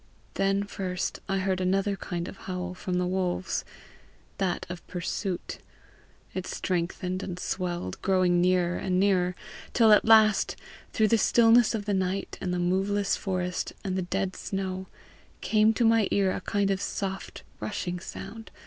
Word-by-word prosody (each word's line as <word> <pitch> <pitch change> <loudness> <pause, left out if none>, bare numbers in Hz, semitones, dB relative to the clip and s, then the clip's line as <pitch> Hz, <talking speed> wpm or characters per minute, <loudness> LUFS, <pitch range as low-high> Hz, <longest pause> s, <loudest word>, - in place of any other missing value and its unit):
Then 195 +1 +1
first 190 -2 -3
I 195 - +1
heard 190 -1 0
another 195 +2 +1
kind 175 -2 -4
of - - -8
howl 180 -1 -5
from 185 0 -4
the 180 0 +1
wolves 185 0 -1 0.8
that 190 -3 -1
of 180 -1 -8
pursuit. 180 +1 -3 0.7
It 185 -1 -4
strengthened 180 +1 -2
and 180 -2 -5
swelled, 175 - -3
growing 185 -2 +3
nearer 180 -1 +2
and 185 -1 0
nearer, 185 -2 +2 0.4
till 225 -2 +6
at 210 - +7
last, 220 -2 +5 0.4
through 215 -1 +2
the 230 - +4
stillness 235 0 +5
of 205 -2 -4
the 205 - 0
night 190 0 -1
and 180 - -2
the 180 - 0
moveless 195 +3 +1
forest 180 -2 -2
and 190 -2 -2
the 190 - 0
dead 190 +1 -2
snow, 190 -1 -4 0.5
came 215 +3 +4
to 240 - +2
my 225 -2 +4
ear 195 -2 +2
a - - -3
kind 200 -1 0
of 195 0 -1
soft 195 -1 -4 0.2
rushing 180 -4 -3
sound. 205 +5 -8
190 Hz, 160 wpm, -28 LUFS, 180-200 Hz, 0.8 s, at